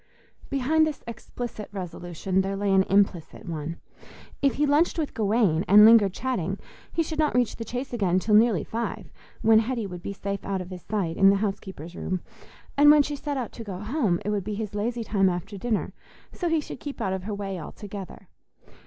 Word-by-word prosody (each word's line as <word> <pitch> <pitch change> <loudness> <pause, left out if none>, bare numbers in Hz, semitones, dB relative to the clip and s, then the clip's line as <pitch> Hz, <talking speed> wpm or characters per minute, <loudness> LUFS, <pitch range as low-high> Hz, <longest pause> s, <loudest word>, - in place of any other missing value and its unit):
Behind 300 +4 +2
this 305 - -5
explicit 235 -1 -7
resolution 180 0 -2
there 195 +1 -2
lay 200 0 0
an 190 0 +5
implicit 195 -4 +1
one. 160 0 -4 0.6
If 275 -2 +2
he 295 - +2
lunched 295 +5 +3
with 310 -3 -2
Gawaine 205 -6 +2
and 210 +2 +9
lingered 220 -3 +7
chatting, 195 -5 -2 0.3
he 330 - +1
should 315 0 -5
not 305 -4 +2
reach 245 -2 +2
the 230 - -4
Chase 250 +4 -5
again 190 -6 +1
till 210 +3 0
nearly 215 -5 +5
five, 230 +1 -4 0.3
when 220 0 +6
Hetty 230 0 -1
would 180 -3 -7
be 200 - -5
safe 200 0 -4
out 195 -1 -2
of 180 0 -7
his 180 -1 -7
sight 190 -5 -2
in 195 - +7
the 200 - +5
housekeeper's 195 -5 -4
room; 185 -1 -3 0.5
and 290 +1 +7
when 295 -1 +7
she 290 +1 -3
set 285 0 -4
out 250 -3 -3
to 230 - -8
go 195 -4 -6
home, 210 - 0
it - - -1
would 205 -2 -1
be 210 +2 -4
his 210 -1 -4
lazy 230 +3 -2
time 195 -3 +2
after 180 +3 -4
dinner, 215 +2 -2 0.4
so 350 - -2
he 325 -1 +2
should - - -8
keep 285 -2 -7
out 190 - -1
of 190 -1 -4
her 210 -1 -3
way 195 -2 -4
altogether. 200 +2 -9
205 Hz, 205 wpm, -26 LUFS, 190-245 Hz, 0.6 s, and